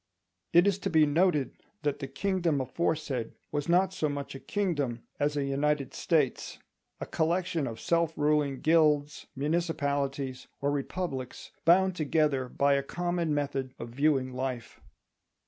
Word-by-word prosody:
It 175 +2 +6
is 200 -1 +2
to 195 - -2
be 160 -3 +5
noted 150 -2 +1 0.2
that 145 -1 0
the 135 - -4
kingdom 170 +1 0
aforesaid 135 -3 -2 0.2
was 145 +1 -2
not 185 +2 +3
so 155 -5 0
much 145 -1 -4
a 135 - -7
kingdom 145 - -2 0.2
as 145 0 +1
a 145 - +1
United 140 0 0
States—a 150 -7 -2
collection 170 -2 0
of 115 -1 -6
self 170 -1 +1
ruling 145 -2 +1
guilds, 150 -2 +2
municipalities, 140 -3 -1
or 140 +1 0
republics, 140 -2 -4
bound 185 +2 +5
together 150 -5 +1
by 140 +2 +2
a 140 - +2
common 175 +2 -2
method 140 -3 -2
of 115 - -7
viewing 135 0 +1
life. 130 -2 -4
145 Hz, 140 wpm, -29 LUFS, 135-170 Hz, 0.2 s, It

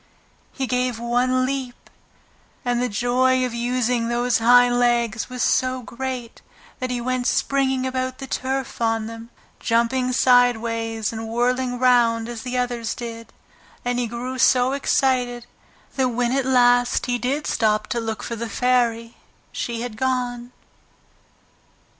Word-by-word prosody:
He 270 - -3
gave 250 -1 -1
one 250 +2 +1
leap 260 -2 -5 0.8
and 245 0 0
the 250 - 0
joy 255 +3 +2
of 250 - -4
using 240 0 0
those 240 0 +1
hind 245 +1 +5
legs 235 -2 +1
was 250 -2 -3
so 255 0 +1
great 250 0 -6 0.4
that 255 - -3
he 250 -1 -2
went 250 +1 -1
springing 265 -1 +1
about 255 0 -2
the 270 - -7
turf 265 0 -3
on 225 -1 +1
them, 230 +1 -9 0.3
jumping 240 +2 +1
sideways 230 -3 +2
and 225 0 -5
whirling 245 +2 0
round 240 -2 +3
as 235 -2 -6
the 250 +1 -4
others 240 -2 -2
did, 230 -1 -8 0.5
and 245 0 0
he 245 - -1
grew 250 +3 -5
so 250 +1 +4
excited 250 -3 0 0.5
that 260 -1 +2
when 245 0 0
at 265 0 0
last 245 -1 +3
he 245 -1 -1
did 275 +5 -1
stop 215 -1 +1
to 240 -3 -1
look 225 -1 -4
for 235 - -4
the 230 0 -5
Fairy 235 -1 0 0.3
she 235 -1 -4
had 235 -3 -6
gone. 245 -1 -2
245 Hz, 145 wpm, -22 LUFS, 235-255 Hz, 0.8 s, hind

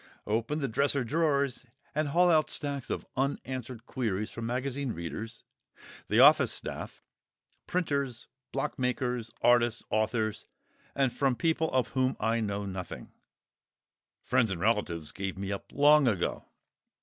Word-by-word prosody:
Open 115 +7 0
the 140 -3 -1
dresser 140 +3 +1
drawers 140 -2 0 0.3
and 155 0 0
haul 175 +5 +4
out 155 -1 +3
stacks 140 -3 -3
of - - -3
unanswered 130 -3 -3
queries 110 -5 -2
from 115 -1 -5
magazine 130 +1 -2
readers, 105 +7 -6 0.6
the - - +2
office - - +7
staff, - - -6 0.6
printers, 140 -8 -1 0.3
block 135 - -3
makers, 125 -2 -1
artists, 120 -1 +4
authors, 110 0 0 0.5
and 135 -3 +2
from 135 -3 +1
people 160 +2 +1
of 130 -1 +1
whom 130 0 0
I 115 +1 +1
know 100 -2 -2
nothing 95 -3 -6 1.1
(friends 115 - +2
and 95 -3 -3
relatives 90 -7 0
gave 95 0 -4
me 100 0 -4
up 100 - -6
long 145 0 +5
ago!). 100 -7 0
125 Hz, 135 wpm, -30 LUFS, 110-140 Hz, 1.1 s, office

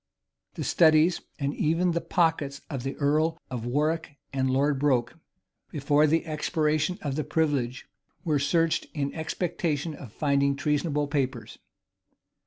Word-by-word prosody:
The - - -4
studies, 160 +1 +4 0.2
and 140 -1 -1
even 165 +3 +1
the 170 0 -1
pockets 155 -5 0
of 135 -3 -3
the 135 +2 -4
earl 155 +3 +1
of 120 -2 -4
Warwick 150 +4 -1 0.2
and 130 -1 0
Lord 140 +2 +2
Broke, 130 -4 +1 0.6
before 145 +1 +2
the 165 +3 +1
expiration 155 +1 0
of 145 0 -3
privilege, 140 -6 0 0.4
were 155 -4 +1
searched, 165 +3 +1
in 140 -2 -2
expectation 160 -1 -2
of 135 -6 -10
finding 140 0 +1
treasonable 150 +1 0
papers. 135 -4 -3
150 Hz, 130 wpm, -27 LUFS, 140-160 Hz, 0.6 s, studies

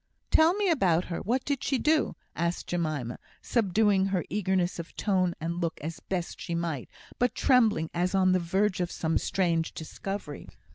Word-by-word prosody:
"Tell 325 +3 +5
me 410 -1 +1
about 185 - +2
her 170 - -4
what 250 +5 -1
did 280 -2 -1
she 270 - +1
do?" 305 +3 +2 0.2
asked 170 +1 -1
Jemima, 155 -8 -2 0.2
subduing 205 -3 +2
her 190 -3 -1
eagerness 185 -3 0
of 165 - -8
tone 185 -4 +1
and 170 +2 -3
look 165 -1 -2
as 160 +3 -5
best 180 -3 -4
she 170 - -3
might, 165 -6 -3 0.3
but 245 0 +1
trembling 220 - +3
as 180 +2 0
on 185 -1 +4
the 185 - +3
verge 185 +2 0
of 175 - -1
some 160 -2 0
strange 170 -4 0
discovery. 160 -1 -6
185 Hz, 175 wpm, -28 LUFS, 170-210 Hz, 0.3 s, Tell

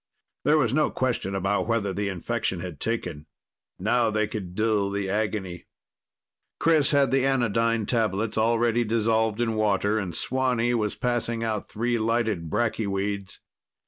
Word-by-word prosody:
There 150 +1 +5
was 125 -6 +2
no 155 +1 +3
question 120 -7 -1
about 100 +2 0
whether 110 -4 0
the 100 0 -1
infection 95 0 -2
had 90 -5 -7
taken. 90 -10 -3 0.5
Now 115 +4 +2
they 110 0 +1
could 95 -4 -6
dull 105 -2 +1
the 100 0 -2
agony. 100 -3 -2 0.9
Chris 155 -3 +4
had 140 -2 +3
the 135 -1 +3
anodyne 115 -4 +1
tablets 110 -2 0
already 115 +1 +2
dissolved 110 0 +1
in 115 -2 +1
water, 105 0 +1
and 90 -5 -4
Swanee 125 -2 0
was 105 -3 0
passing 120 -2 -1
out 110 -2 -2
three 120 +2 -1
lighted 110 -7 0
bracky 110 0 0
weeds. 100 0 -3
110 Hz, 145 wpm, -26 LUFS, 100-120 Hz, 0.9 s, There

